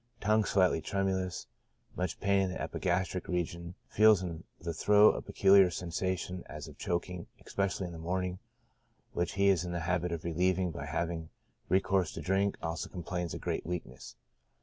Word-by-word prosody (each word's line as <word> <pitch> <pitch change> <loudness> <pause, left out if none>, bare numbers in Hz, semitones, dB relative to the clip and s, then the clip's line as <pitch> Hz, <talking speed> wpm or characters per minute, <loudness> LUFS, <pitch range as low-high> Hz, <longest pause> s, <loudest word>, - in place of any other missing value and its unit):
Tongue 110 +1 +3
slightly 95 -5 +3
tremulous; 95 -2 -1 0.5
much 90 -2 -2
pain 100 0 +3
in 95 -1 0
the - - -5
epigastric 90 0 -1
region; 85 0 -3
feels 105 -3 +5
in 85 -3 -5 0.2
the 85 0 -4
throat 105 +6 +6
a - - -3
peculiar 95 -1 +5
sensation 90 +1 -3
as 75 -2 -7
of - - -13
choking, 90 0 -3 0.2
especially 100 -1 -1
in 85 - -6
the 80 - -8
morning, 90 +2 -2 0.7
which 85 0 -1
he 100 0 +3
is 90 -3 +3
in 90 -1 -4
the 85 - -2
habit 90 0 0
of 85 -1 -3
relieving 90 +2 +1
by 70 -2 -6
having 80 0 -2 0.4
recourse 95 -2 +2
to - - -6
drink; 95 +5 +1
also 80 0 -3
complains 90 -1 -4
of - - -7
great - - -2
weakness. 85 -7 -6
90 Hz, 170 wpm, -31 LUFS, 85-95 Hz, 0.7 s, throat